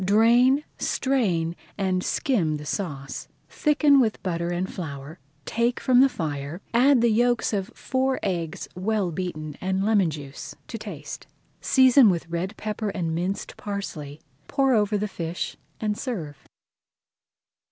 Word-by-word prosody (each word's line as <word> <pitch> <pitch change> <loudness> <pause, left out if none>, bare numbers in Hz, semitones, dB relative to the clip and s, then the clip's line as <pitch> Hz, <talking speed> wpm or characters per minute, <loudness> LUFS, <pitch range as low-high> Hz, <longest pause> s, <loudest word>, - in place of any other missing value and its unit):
Drain, 235 +8 +5 0.2
strain, 185 -12 0 0.2
and 185 -2 0
skim 185 - +1
the 150 - -9
sauce, 145 -6 -4 0.2
thicken 300 -2 +4
with 225 -4 +1
butter 170 -2 -1
and 175 +1 -1
flour, 155 -2 -7 0.3
take 235 +1 0
from 255 -2 +4
the 270 +1 +7
fire, 150 - -4
add 255 +1 +5
the 235 -1 +4
yolks 240 +1 +2
of 200 0 -1
four 260 0 0
eggs 170 -5 -2
well 195 0 0
beaten 155 -4 -4
and 190 +1 0
lemon 205 -5 +3
juice 145 -2 -8
to - - -5
taste. - - -8 0.3
Season 260 -3 +6
with 170 -3 -1
red 170 +3 -3
pepper 215 0 -3
and 170 -5 -2
minced 180 +4 -3
parsley, 160 -8 -5 0.3
pour 270 -2 +2
over 210 -2 +2
the 210 +1 -1
fish, 170 -3 -4 0.2
and 210 -1 -1
serve. 155 - -5
195 Hz, 140 wpm, -25 LUFS, 165-235 Hz, 0.3 s, the